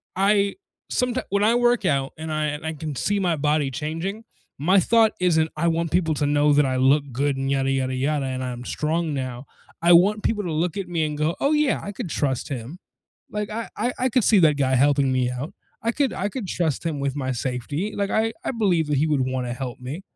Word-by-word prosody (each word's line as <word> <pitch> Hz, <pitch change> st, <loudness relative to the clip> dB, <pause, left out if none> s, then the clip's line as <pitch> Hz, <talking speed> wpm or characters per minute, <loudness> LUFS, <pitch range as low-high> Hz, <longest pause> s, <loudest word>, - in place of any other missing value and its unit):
I 200 Hz, +1 st, +2 dB, 0.4 s
someti 250 Hz, 0 st, 0 dB
when 200 Hz, +1 st, +1 dB
I 225 Hz, +2 st, +4 dB
work 240 Hz, -3 st, +2 dB
out 135 Hz, -4 st, 0 dB
and 160 Hz, 0 st, -5 dB
I 155 Hz, 0 st, 0 dB
and 150 Hz, +1 st, -4 dB
I 160 Hz, -, -2 dB
can 150 Hz, -2 st, -5 dB
see 205 Hz, -, 0 dB
my 175 Hz, -4 st, +1 dB
body 150 Hz, -1 st, +1 dB
changing, 165 Hz, -, -4 dB, 0.3 s
my 185 Hz, +8 st, +4 dB
thought 225 Hz, +3 st, +4 dB
isn't, 160 Hz, -3 st, +2 dB
"I 170 Hz, +3 st, 0 dB
want 165 Hz, -1 st, 0 dB
people 165 Hz, -3 st, +1 dB
to 145 Hz, -, 0 dB
know 145 Hz, +1 st, +3 dB
that 145 Hz, 0 st, +4 dB
I 130 Hz, -1 st, 0 dB
look 140 Hz, +2 st, +3 dB
good 140 Hz, +2 st, 0 dB
and 135 Hz, 0 st, -1 dB
yada, 135 Hz, -1 st, +1 dB
yada, 130 Hz, -1 st, 0 dB
yada, 140 Hz, +2 st, 0 dB
and 130 Hz, -1 st, -3 dB
I'm 125 Hz, -1 st, -5 dB
strong 160 Hz, +2 st, -1 dB
now." 130 Hz, -1 st, -4 dB, 0.4 s
I 175 Hz, +1 st, +6 dB
want 200 Hz, +5 st, +5 dB
people 210 Hz, -2 st, 0 dB
to 175 Hz, -, -3 dB
look 160 Hz, +2 st, -1 dB
at 195 Hz, -2 st, -3 dB
me 165 Hz, -2 st, 0 dB
and 150 Hz, -1 st, -3 dB
go, 155 Hz, +2 st, 0 dB
"Oh 280 Hz, -, +2 dB
yeah, 300 Hz, -2 st, +2 dB
I 205 Hz, -, -5 dB
could 185 Hz, -, -5 dB
trust 140 Hz, -2 st, -1 dB
him. 135 Hz, +6 st, -6 dB, 0.5 s
Like 210 Hz, 0 st, -3 dB
I 225 Hz, +1 st, -4 dB
I 245 Hz, -, 0 dB
I 255 Hz, -, +2 dB
could 250 Hz, 0 st, +2 dB
see 210 Hz, -1 st, +5 dB
that 155 Hz, -4 st, +4 dB
guy 130 Hz, -2 st, +1 dB
helping 140 Hz, 0 st, +3 dB
me 130 Hz, -1 st, +1 dB
out, 125 Hz, +5 st, -5 dB, 0.3 s
I 230 Hz, -, +1 dB
could 275 Hz, 0 st, 0 dB
I 200 Hz, -, -2 dB
could 230 Hz, -4 st, -5 dB
trust 165 Hz, -6 st, -1 dB
him 155 Hz, -3 st, -2 dB
with 140 Hz, 0 st, -2 dB
my 130 Hz, -2 st, -2 dB
safety, 130 Hz, -, -3 dB
like 200 Hz, -1 st, -1 dB
I 225 Hz, +2 st, +1 dB
I -, -, -2 dB
believe 190 Hz, -, +1 dB
that 150 Hz, -1 st, +1 dB
he 145 Hz, -, +2 dB
would 150 Hz, -3 st, +1 dB
wanna 130 Hz, -1 st, -2 dB
help 125 Hz, -1 st, -6 dB
me," 130 Hz, +8 st, -6 dB
155 Hz, 240 wpm, -23 LUFS, 135-195 Hz, 0.5 s, I